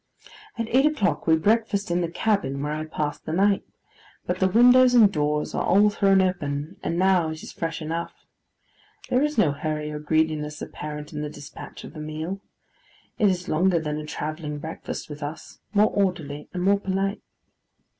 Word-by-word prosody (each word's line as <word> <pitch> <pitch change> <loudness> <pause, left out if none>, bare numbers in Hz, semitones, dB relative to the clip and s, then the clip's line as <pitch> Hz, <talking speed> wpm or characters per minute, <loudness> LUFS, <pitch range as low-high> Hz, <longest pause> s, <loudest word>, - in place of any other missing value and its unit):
At 230 -1 -2
eight 270 +4 +4
o'clock, 260 - 0
we 160 - +6
breakfast 205 +2 +1
in 175 +1 +1
the 170 - -1
cabin 185 -7 0
where 150 - -2
I 155 +1 -3
passed 150 -1 -4
the - - -2
night, 195 +4 +3 0.6
but 180 +1 -2
the 190 - +4
windows 245 +4 +6
and 210 -4 +6
doors 150 0 0
are - - 0
all 205 +3 +4
thrown 195 -2 +4
open, 155 -1 -2
and 170 - -2
now 185 -3 +3
it 160 +1 -7
is - - -8
fresh 165 -1 -4
enough. 165 +2 -5 0.8
There 250 - +3
is 300 +1 0
no 165 -9 +4
hurry 150 +1 -3
or 150 - -5
greediness 150 -1 0
apparent 150 +1 -7
in 150 - -4
the 150 - -3
despatch 145 -1 -10
of - - -10
the 155 - -9
meal. 155 +5 -5 0.8
It 210 -3 +5
is 180 -1 -2
longer 175 +3 +2
than 150 -1 -3
a 155 - -6
travelling 150 0 -4
breakfast 160 +2 -6
with 150 0 -9
us; 145 +2 -7
more 210 0 +4
orderly, 160 -7 -1
and 180 -1 -3
more 200 +1 +4
polite. 195 +1 -1
170 Hz, 185 wpm, -25 LUFS, 150-200 Hz, 0.8 s, we